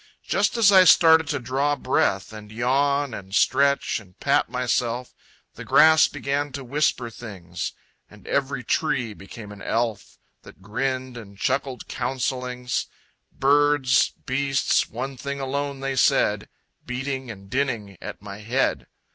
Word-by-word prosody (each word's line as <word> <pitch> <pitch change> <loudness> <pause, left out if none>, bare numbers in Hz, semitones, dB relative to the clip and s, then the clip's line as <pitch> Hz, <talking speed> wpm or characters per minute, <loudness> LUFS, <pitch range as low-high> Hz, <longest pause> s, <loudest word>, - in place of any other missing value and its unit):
Just - - 0
as 215 -3 +6
I 190 -2 +8
started 160 -2 +6
to 145 - -1
draw 135 +3 0
breath, 100 -7 0
And 105 -1 -10
yawn, 140 +3 +1
and 95 -2 -7
stretch, 140 -1 +2
and 90 -4 -19
pat - - +2
myself, 125 0 -1 0.4
The - - -9
grass 160 0 +6
began 145 +1 -3
to 140 -1 -5
whisper 130 -3 0
things 90 -7 -7 0.4
And - - -17
every 140 -2 -1
tree 125 -8 -1
became 105 +2 -11
an 100 -1 -11
elf, 115 -3 -2 0.2
That - - -15
grinned 130 +5 -3
and 100 -4 -11
chuckled 130 +3 -2
counsellings: 125 -1 -3 0.4
Birds, 145 -1 +3 0.2
beasts, 135 +1 +1
one 130 +3 -5
thing 140 +2 -5
alone 140 +1 -3
they 135 0 -2
said, 130 - +2 0.3
Beating 130 0 -4
and 100 -3 -10
dinning 115 -5 -2
at - - -8
my 100 0 -8
head. 105 - -1
130 Hz, 140 wpm, -24 LUFS, 115-140 Hz, 0.4 s, I